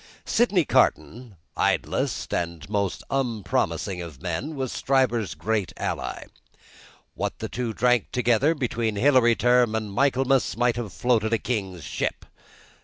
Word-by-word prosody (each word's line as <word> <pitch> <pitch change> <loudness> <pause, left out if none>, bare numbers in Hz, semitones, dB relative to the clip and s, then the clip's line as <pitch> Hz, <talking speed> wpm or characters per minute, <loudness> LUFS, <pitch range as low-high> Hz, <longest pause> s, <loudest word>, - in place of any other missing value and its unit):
Sydney 205 -8 +2
Carton, 120 -4 +1 0.2
idlest - - -1
and 85 -3 -3
most 100 -2 -2
unpromising 110 -7 -1
of 80 -6 -9
men, 95 - -4
was 130 -3 -3
Stryver's 125 -6 +1
great 105 0 -1
ally. - - -3 0.9
What - - -3
the - - -4
two 120 -1 -3
drank 125 0 +1
together, 125 +6 +2
between 115 -5 -1
Hilary 120 0 +4
Term 120 -2 +3
and 110 -2 -3
Michaelmas, 135 +1 +2
might 120 0 +2
have 115 -5 -4
floated 115 -3 +1
a - - +4
king's 95 - -3
ship. - - -3
120 Hz, 130 wpm, -25 LUFS, 105-130 Hz, 0.9 s, Hilary